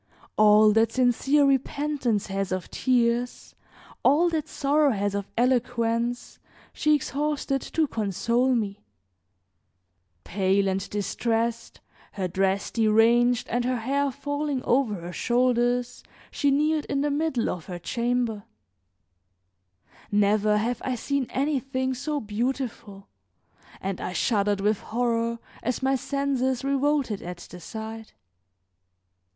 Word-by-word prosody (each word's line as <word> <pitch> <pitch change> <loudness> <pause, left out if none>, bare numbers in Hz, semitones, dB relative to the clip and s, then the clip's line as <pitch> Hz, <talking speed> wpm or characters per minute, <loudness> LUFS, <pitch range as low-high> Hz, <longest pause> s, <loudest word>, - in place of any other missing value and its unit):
All 215 0 +6
that 225 +1 +3
sincere 260 +3 +3
repentance 275 -4 0
has 195 -1 -3
of 185 -1 -3
tears, 245 -1 0 0.5
all 310 +6 +4
that 315 -2 -2
sorrow 295 0 +2
has 205 -1 -1
of 200 -1 -3
eloquence, 240 -1 0 0.3
she 305 0 +3
exhausted 285 -1 -1
to 320 - 0
console 235 +3 0
me; 205 -3 -2 1.4
pale 195 +1 +1
and 190 0 -2
distressed, 230 +3 -2 0.3
her 190 -2 -2
dress 190 +2 0
deranged 230 +2 +3
and 245 +1 0
her 255 +1 0
hair 275 +5 0
falling 285 0 -3
over 245 -4 +2
her 175 -1 -7
shoulders 245 +1 +1 0.3
she 285 - +1
kneeled 300 +2 +1
in 275 0 -1
the 290 0 0
middle 285 -5 0
of 170 -3 -4
her 180 - -5
chamber; 235 +2 -1 1.7
never 210 +1 +3
have 235 +3 -1
I 255 - -1
seen 275 +2 -2
anything 265 -2 -1
so 285 +3 -3
beautiful 225 -2 -4 0.7
and 195 -1 -4
I 180 - -4
shuddered 205 -2 +1
with 210 0 +1
horror 235 0 -1 0.2
as 250 +2 -2
my 265 +1 +2
senses 265 -1 -1
revolted 275 -5 0
at 180 0 -7
the 180 - -9
sight. 220 - -8
240 Hz, 120 wpm, -26 LUFS, 210-275 Hz, 1.7 s, All